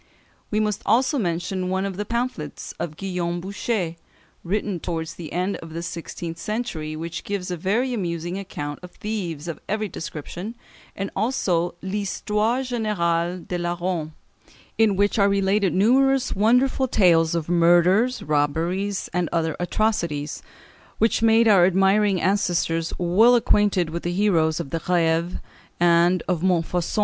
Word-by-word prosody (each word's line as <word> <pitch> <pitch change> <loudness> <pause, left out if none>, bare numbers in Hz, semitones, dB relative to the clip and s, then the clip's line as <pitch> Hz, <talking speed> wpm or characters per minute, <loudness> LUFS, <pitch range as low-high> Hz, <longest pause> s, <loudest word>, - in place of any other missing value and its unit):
We 215 - 0
must 210 -2 0
also 255 +6 +2
mention 180 0 -2
one 190 +1 0
of 195 -2 -4
the 210 +2 -3
pamphlets 235 - -4
of 155 -2 -4
Guillaume 175 -3 -2
Bouchet, 190 -2 -2 0.5
written 200 0 -2
towards 160 -1 -4
the 165 -3 -9
end 180 +3 -1
of 165 -1 -10
the 170 - -4
sixteenth 170 0 -6
century, 170 -8 -3
which 165 +1 -5
gives 195 -3 -4
a - - -1
very 220 +9 0
amusing 175 -3 -3
account 145 -7 -6
of 180 - -10
thieves 175 -8 -4
of 165 -3 -5
every 215 +1 -1
description, 175 +5 -7 0.4
and 195 0 -4
also 190 -7 0
"L'Histoire 210 +4 -1
Générale 180 -8 -1
des 180 - -2
Larrons," 175 -2 -2 0.6
in 220 -3 +3
which 205 +3 +1
are 200 0 +5
related 200 -1 +2
numerous 260 - +3
wonderful 250 +5 +3
tales 170 -7 +3
of 165 -2 -2
murders, 175 +8 +3
robberies, 165 +7 0
and 175 -2 0
other 160 -2 0
atrocities, 175 -6 -1 0.6
which 225 0 +2
made 225 0 +5
our 195 -5 +6
admiring 195 +2 +3
ancestors 170 -4 0
well 200 +8 +5
acquainted 205 -7 +2
with 170 +1 -3
the 175 - -2
heroes 175 -5 +2
of 140 -5 -5
the 165 - -1
Grève 170 0 +1 0.4
and 175 +1 +4
of 180 -3 0
Montfaucon. 175 -1 0
180 Hz, 145 wpm, -23 LUFS, 170-210 Hz, 0.6 s, our